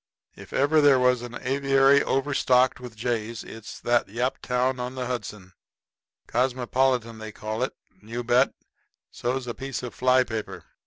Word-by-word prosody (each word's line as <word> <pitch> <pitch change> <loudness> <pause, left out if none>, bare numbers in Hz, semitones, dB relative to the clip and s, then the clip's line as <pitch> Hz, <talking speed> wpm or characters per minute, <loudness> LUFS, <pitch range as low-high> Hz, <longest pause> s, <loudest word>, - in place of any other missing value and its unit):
If - - -12
there - - 0
ever 145 -1 +5
was 125 -1 +3
an 120 0 -7
aviary 135 +1 +4
overstocked 130 -2 +2
with 125 -3 -9
jays 115 -1 -3
it 110 -1 -11
is - - -8
that 120 0 +2
Yaptown 125 +2 -1
on 125 +1 -4
the 130 -1 -3
Hudson. 105 -6 -6 0.7
Cosmopolitan 125 -1 0
they 110 0 -7
call 110 +2 -5
it. 130 - -1 0.3
You 115 +3 -5
bet. 120 +1 +3 0.6
So's 125 +1 -2
a 120 - -4
piece 135 0 -5
of 125 - -6
fly 130 0 +3
paper. 110 -3 -6
125 Hz, 155 wpm, -25 LUFS, 115-130 Hz, 0.7 s, ever